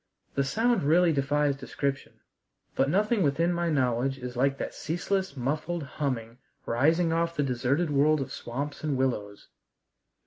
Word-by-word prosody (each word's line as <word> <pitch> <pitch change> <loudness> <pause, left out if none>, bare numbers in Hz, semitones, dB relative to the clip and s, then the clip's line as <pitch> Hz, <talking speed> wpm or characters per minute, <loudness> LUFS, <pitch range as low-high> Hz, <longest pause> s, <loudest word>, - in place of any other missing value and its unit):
The 140 - +1
sound 225 - +1
really 165 +3 +4
defies 145 0 +1
description. 135 0 -3 0.6
But 135 - +2
nothing 210 +5 +2
within 165 +3 +2
my 170 0 0
knowledge 130 -2 +1
is 125 -1 -7
like 135 +2 +1
that - - -4
ceaseless 190 +2 -2
muffled 155 +6 -2
humming 125 -5 -4 0.3
rising 160 +8 +2
off 170 0 0
the 145 - +1
deserted 135 +5 0
world 150 +2 +3
of 135 - -4
swamps 140 +6 -5
and 150 -3 0
willows. 105 -6 -2
145 Hz, 145 wpm, -28 LUFS, 135-165 Hz, 0.6 s, really